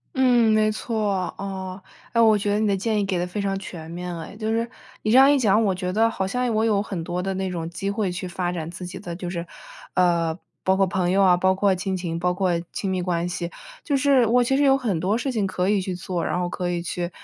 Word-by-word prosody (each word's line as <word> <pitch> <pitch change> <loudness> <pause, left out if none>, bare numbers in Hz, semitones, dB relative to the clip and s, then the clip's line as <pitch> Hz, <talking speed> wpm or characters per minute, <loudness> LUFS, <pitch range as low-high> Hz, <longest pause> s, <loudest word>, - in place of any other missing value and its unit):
嗯， 245 -4 +4
没 215 0 +3
错， 210 -4 -1
啊， 190 -1 -5 0.3
哎， 230 - +1
我 220 -2 +6
觉 205 0 -1
得 205 - +1
你 215 - +2
的 200 - +2
建 210 +2 0
议 200 - +1
给 190 -2 -1
得 175 - 0
非 180 +4 -5
常 195 -1 -1
全 170 -4 -8
面 175 +1 -5
了 165 -1 -5
哎。 - - -11
就 215 0 -2
是 230 +1 0 0.3
你 215 - +1
这 245 - +6
样 270 +2 +8
一 290 - +3
讲， 215 -2 +3
我 200 -3 +2
觉 180 0 -3
得 225 +3 +3
好 190 -4 -2
像 250 +3 -1
我 220 +1 +2
有 210 -3 +2
很 190 -5 -4
多 175 +2 -3
的 195 0 -1
那 190 0 -2
种 170 -2 -4
机 195 +3 -4
会 200 -2 -1
去 185 +1 -4
发 175 0 -2
展 165 -2 -4
自 180 +1 -7
己 175 - -7
的 170 -1 -6
就 175 0 -5
是， 170 -1 -4 0.5
呃， 170 -2 +2 0.3
包 190 - +4
括 195 0 +3
朋 180 -1 0
友 195 +1 +3
啊， 180 -2 +5
包 190 +1 +3
括 195 0 +3
亲 190 +1 -2
情， 170 -2 -3
包 180 +1 +1
括 185 0 0 0.2
亲 195 - -2
密 185 -1 -1
关 175 -1 -1
系、 175 -1 -4 0.3
就 285 - +1
是 270 -2 +4
我 245 +2 +4
其 270 +3 +1
实 290 - +3
有 270 -1 +5
很 215 -11 -1
多 200 +5 +1
事 265 +2 -2
情 215 -5 0
可 185 0 -1
以 205 -1 +3
去 185 -1 -3
做， 175 -1 -3
然 - - -1
后 175 0 -1
可 180 0 -3
以 175 -1 -1
去， 175 0 -3
190 Hz, 290 characters per minute, -24 LUFS, 180-215 Hz, 0.5 s, 样